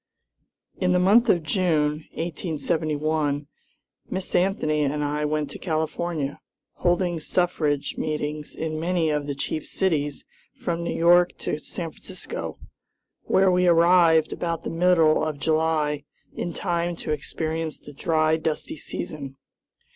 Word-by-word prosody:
In 180 Hz, -1 st, +2 dB
the -, -, +4 dB
month 215 Hz, +6 st, +5 dB
of 170 Hz, -5 st, +4 dB
June, 155 Hz, -2 st, +1 dB
1871, 155 Hz, -3 st, -1 dB, 0.6 s
Miss 190 Hz, 0 st, -3 dB
Anthony 175 Hz, -5 st, +2 dB
and 150 Hz, +1 st, 0 dB
I 150 Hz, +1 st, -1 dB
went 150 Hz, -1 st, -1 dB
to -, -, -8 dB
California, 160 Hz, -2 st, -2 dB, 0.4 s
holding 175 Hz, -1 st, +1 dB
suffrage 155 Hz, -4 st, 0 dB
meetings 150 Hz, -1 st, -3 dB
in 155 Hz, -1 st, -3 dB
many 170 Hz, -1 st, +1 dB
of 150 Hz, -1 st, -1 dB
the 140 Hz, -, -2 dB
chief 150 Hz, +2 st, -3 dB
cities 150 Hz, -7 st, -1 dB, 0.3 s
from 170 Hz, -1 st, -3 dB
New -, -, -2 dB
York 175 Hz, +1 st, +5 dB
to 150 Hz, -, -1 dB
San 165 Hz, +1 st, -5 dB
Francisco, -, -, -7 dB, 0.7 s
where 190 Hz, 0 st, +4 dB
we 180 Hz, 0 st, +3 dB
arrived 170 Hz, -2 st, +5 dB
about 170 Hz, -1 st, -3 dB
the -, -, -3 dB
middle 165 Hz, -3 st, +4 dB
of 155 Hz, -2 st, -2 dB
July, 155 Hz, -1 st, +1 dB, 0.3 s
in 175 Hz, -, -3 dB
time 170 Hz, 0 st, -1 dB
to 160 Hz, -, -5 dB
experience 160 Hz, +1 st, -3 dB
the 145 Hz, -, -12 dB
dry, 155 Hz, +2 st, +2 dB
dusty 160 Hz, 0 st, -3 dB
season. 140 Hz, -2 st, -6 dB
160 Hz, 130 wpm, -25 LUFS, 150-175 Hz, 0.7 s, month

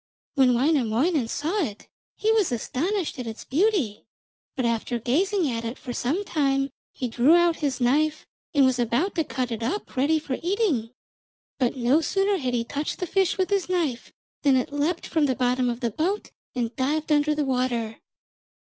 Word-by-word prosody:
When 255 Hz, -3 st, +4 dB
Wainamoinen 265 Hz, +1 st, +2 dB
saw 325 Hz, -, -1 dB
it 210 Hz, -8 st, -6 dB, 0.3 s
he 435 Hz, -, +1 dB
was 430 Hz, -8 st, +2 dB
astonished 310 Hz, -, -2 dB
at 245 Hz, -, -4 dB
its 220 Hz, -1 st, -7 dB
beauty, 315 Hz, -, +1 dB, 0.5 s
but 255 Hz, -, -1 dB
after 235 Hz, +1 st, 0 dB
gazing 345 Hz, -, +1 dB
at 230 Hz, 0 st, -3 dB
it 230 Hz, +2 st, -4 dB
for 245 Hz, -, -6 dB
some 310 Hz, +13 st, -1 dB
time 275 Hz, -5 st, +1 dB, 0.2 s
he 255 Hz, -, -3 dB
drew 245 Hz, +7 st, +4 dB
out 345 Hz, -1 st, +3 dB
his 280 Hz, -4 st, -1 dB
knife 300 Hz, +5 st, +1 dB, 0.3 s
and 280 Hz, -3 st, +4 dB
was 260 Hz, -1 st, +2 dB
about 245 Hz, -, +1 dB
to 325 Hz, -, +1 dB
cut 255 Hz, -4 st, -3 dB
it 230 Hz, 0 st, -3 dB
up 340 Hz, -, -3 dB
ready 285 Hz, +5 st, +3 dB
for 290 Hz, -4 st, -4 dB
eating. 345 Hz, -, 0 dB, 0.7 s
But 255 Hz, 0 st, +1 dB
no 255 Hz, +6 st, +3 dB
sooner 390 Hz, +5 st, +1 dB
had 250 Hz, -4 st, -1 dB
he 235 Hz, -, 0 dB
touched 285 Hz, +5 st, -3 dB
the 360 Hz, -, -2 dB
fish 380 Hz, +1 st, +1 dB
with 375 Hz, +1 st, 0 dB
his 390 Hz, -3 st, +1 dB
knife 325 Hz, -10 st, -1 dB, 0.3 s
than 280 Hz, -3 st, +4 dB
it 255 Hz, +3 st, -2 dB
leapt 305 Hz, +4 st, -1 dB
from 310 Hz, -3 st, +1 dB
the 260 Hz, -, 0 dB
bottom 250 Hz, 0 st, +1 dB
of 240 Hz, +1 st, -4 dB
the 235 Hz, -2 st, 0 dB
boat 365 Hz, -, -2 dB, 0.2 s
and 240 Hz, -2 st, -2 dB
dived 305 Hz, +4 st, -1 dB
under 300 Hz, 0 st, +3 dB
the 300 Hz, -1 st, 0 dB
water. 245 Hz, -4 st, -1 dB
275 Hz, 185 wpm, -25 LUFS, 245-335 Hz, 0.7 s, When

